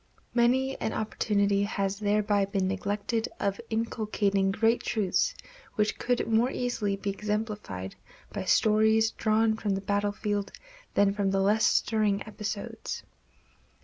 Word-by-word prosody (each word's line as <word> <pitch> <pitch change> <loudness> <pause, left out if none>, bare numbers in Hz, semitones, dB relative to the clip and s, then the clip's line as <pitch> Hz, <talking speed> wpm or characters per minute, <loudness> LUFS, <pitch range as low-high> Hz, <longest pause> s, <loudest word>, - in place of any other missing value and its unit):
Many 255 +3 +2
an 220 - -1
opportunity 200 -2 +1
has 200 -1 -1
thereby 205 -1 +2
been 195 -1 -1
neglected 205 +3 -2
of 200 0 -1
inculcating 210 -3 0
great 225 +4 +2
truths 215 - 0 0.4
which 210 0 0
could 245 0 0
more 230 +2 +3
easily 235 -6 -1
be 200 0 -3
exemplified 210 - -4 0.4
by - - -3
stories 220 +1 +4
drawn 220 0 +2
from 205 -3 -1
the 195 - -3
battlefield 205 0 -1 0.4
than 200 -1 +4
from 200 -1 0
less 195 +3 +3
stirring 210 -3 +1
episodes. 210 -1 -5
210 Hz, 120 wpm, -28 LUFS, 200-220 Hz, 0.4 s, stories